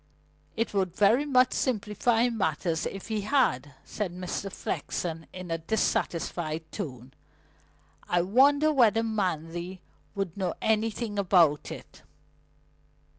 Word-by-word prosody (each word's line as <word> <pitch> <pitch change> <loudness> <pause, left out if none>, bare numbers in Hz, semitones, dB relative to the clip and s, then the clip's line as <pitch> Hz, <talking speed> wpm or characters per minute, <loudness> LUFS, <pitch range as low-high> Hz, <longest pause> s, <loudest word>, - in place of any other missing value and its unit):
"It 230 -1 -1
would 190 -3 0
very 220 +9 +4
much 255 -3 +4
simplify 230 0 +1
matters 165 -7 -1
if 195 +3 -8
he 215 -1 -1
had," 145 - +1
said 210 -4 -3
Mr. 180 +2 -4
Flexen 165 -3 -4
in 185 -2 -8
a 165 - -1
dissatisfied 165 -3 -1
tone. 130 - -7 1.0
"I 175 -1 +2
wonder 285 - +4
whether 225 -5 +4
Manley 180 -4 -2 0.4
would 195 -4 -3
know 185 -4 -2
anything 220 -1 0
about 170 -6 +3
it?" - - -10
195 Hz, 115 wpm, -28 LUFS, 170-225 Hz, 1.0 s, very